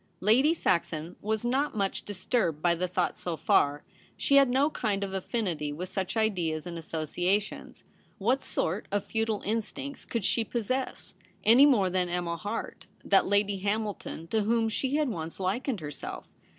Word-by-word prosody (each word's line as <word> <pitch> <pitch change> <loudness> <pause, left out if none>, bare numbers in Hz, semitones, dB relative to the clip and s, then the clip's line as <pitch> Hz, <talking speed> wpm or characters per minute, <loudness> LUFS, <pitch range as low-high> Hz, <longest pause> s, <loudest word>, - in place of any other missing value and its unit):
Lady 245 +10 +4
Saxon 170 - 0
was 220 +2 -1
not 265 +1 0
much 195 -1 -1
dis 195 -3 -8
turbed 170 - +1
by 170 +2 +3
the 180 +2 -1
thought 180 0 0
so 170 -2 -3
far. 145 -1 +2 0.3
She 280 - +4
had 275 -2 +6
no 275 +5 +3
kind 205 -7 -1
of 195 -1 -4
affinity 185 -7 -2
with 175 +5 -5
such 190 +2 -3
ideas 175 -8 0
and 175 -1 -6
associa 165 +4 0
tions. 210 - -10 0.3
What 245 +7 +1
sort 185 +6 -1
of 205 0 0
feudal 225 -2 -1
instincts 230 +6 -3
could 230 -6 -2
she 230 - +2
possess, 250 +4 -3 0.3
any 245 +6 +8
more 200 -10 +3
than 180 -1 0
Emma 175 -1 -1
Harte, 205 +7 -5 0.2
that 195 - +4
Lady 205 0 +2
Hamilton 205 -4 -2
to 220 - +2
whom 225 +1 +2
she 265 +5 -1
had 305 -1 +2
once 165 -5 -5
likened 210 - -1
herself? 145 -2 -6
200 Hz, 170 wpm, -29 LUFS, 175-230 Hz, 0.3 s, any